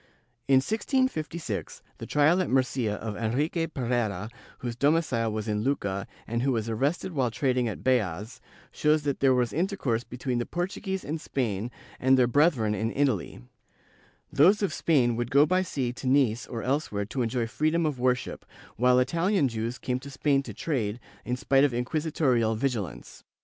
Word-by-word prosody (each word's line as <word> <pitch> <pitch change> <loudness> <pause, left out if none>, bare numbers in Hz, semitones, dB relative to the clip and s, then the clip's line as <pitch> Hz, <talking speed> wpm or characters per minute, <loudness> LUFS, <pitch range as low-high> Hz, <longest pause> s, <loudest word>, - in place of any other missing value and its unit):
In 135 - +5
1656, 170 - -1 0.2
the - - -7
trial 155 +5 +3
at 185 - -2
Murcia 130 -4 +1
of 110 0 -5
Enrique 145 +10 -1
Pereira, 115 - -2 0.3
whose 120 -2 -5
domicile 140 -5 +1
was 110 0 -4
in 105 -1 0
Lucca 100 -7 -1 0.2
and 115 +1 -2
who 135 +2 +1
was 115 -2 -1
arrested 140 +11 -1
while 135 -6 0
trading 125 0 0
at 110 - -5
Beas, 115 -1 0 0.3
shows 150 0 +2
that 140 -2 -1
there 135 -1 +4
was 125 -2 0
intercourse 160 - -1
between 125 0 -3
the 120 - -1
Portuguese 190 +2 -3
in 155 +2 -3
Spain 115 -7 -2 0.3
and 130 +1 +4
their 125 - +5
brethren 120 -4 +3
in 110 +2 -1
Italy; 130 - -1 0.9
those 190 +9 +5
of 200 - 0
Spain 125 -8 +2
would 120 0 -2
go 140 +2 +5
by 185 +4 +2
sea 130 -9 -2
to 130 - -6
Nice 125 -4 +2
or 115 -2 -5
else 140 +4 -1
where 100 -1 -2
to 125 +5 -3
enjoy 120 0 0
freedom 155 +7 0
of 145 -5 -2
worship, 125 0 0 0.3
while 125 +2 +4
Itahan 165 +4 +2
Jews 115 +2 -3
came 125 0 -2
to 140 - -10
Spain 140 0 +1
to - - -8
trade, 120 -8 -2 0.3
in 125 - -1
spite 135 +2 +3
of 140 -4 +2
inquisitorial 125 -4 +1
vigilance. 110 - -4
130 Hz, 170 wpm, -27 LUFS, 115-150 Hz, 0.9 s, In